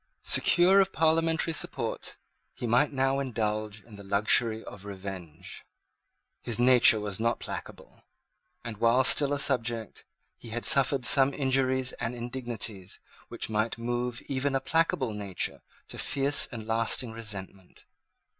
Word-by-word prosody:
Secure 185 +3 +5
of 190 0 0
parliamentary 165 0 +1
support, - - -2 0.4
he - - -6
might 125 +6 +2
now 135 0 0
indulge 110 -5 -3
in 110 -3 -15
the 100 - -11
luxury 110 +3 +1
of 100 - -11
revenge. 95 -4 -9 0.8
His 115 - 0
nature 120 -3 +5
was 105 -2 -5
not 115 +1 0
placable; - - -9 0.6
and, 115 -3 -6
while 115 +4 +3
still 140 +1 +4
a 145 - 0
subject, 115 -5 -1 0.4
he 115 - -11
had 120 +1 -5
suffered 135 -1 +4
some 135 +2 +4
injuries 130 -2 +1
and 120 - -3
indignities 120 -6 -5 0.3
which - - -4
might 110 +1 -2
move 120 +1 -3
even 135 0 -2
a - - +2
placable 135 -4 0
nature 100 -3 -4 0.3
to - - -8
fierce 140 +1 +2
and 115 -3 -7
lasting 115 +2 +2
resentment. 100 -4 -9
120 Hz, 135 wpm, -28 LUFS, 110-135 Hz, 0.8 s, Secure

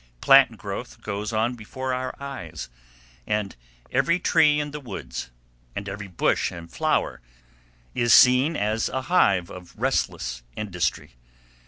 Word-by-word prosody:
Plant 135 - +6
growth 100 +5 -7
goes 105 +1 -4
on 110 +2 +1
before 130 +3 -5
our 130 0 -3
eyes, 135 - -7 0.6
and 105 -2 -1 0.4
every 170 +1 +2
tree 150 -4 +4
in 145 0 -3
the 150 - -6
woods, 90 - -7 0.5
and 100 - -5
every 100 +1 -6
bush 90 - +1
and 85 -1 -10
flower - - 0 0.7
is 120 -1 +1
seen 130 +8 +6
as 110 0 0
a 130 - -3
hive 100 - +2
of 90 -1 -11
restless - - -1
industry. 90 - -3
110 Hz, 135 wpm, -25 LUFS, 95-130 Hz, 0.7 s, Plant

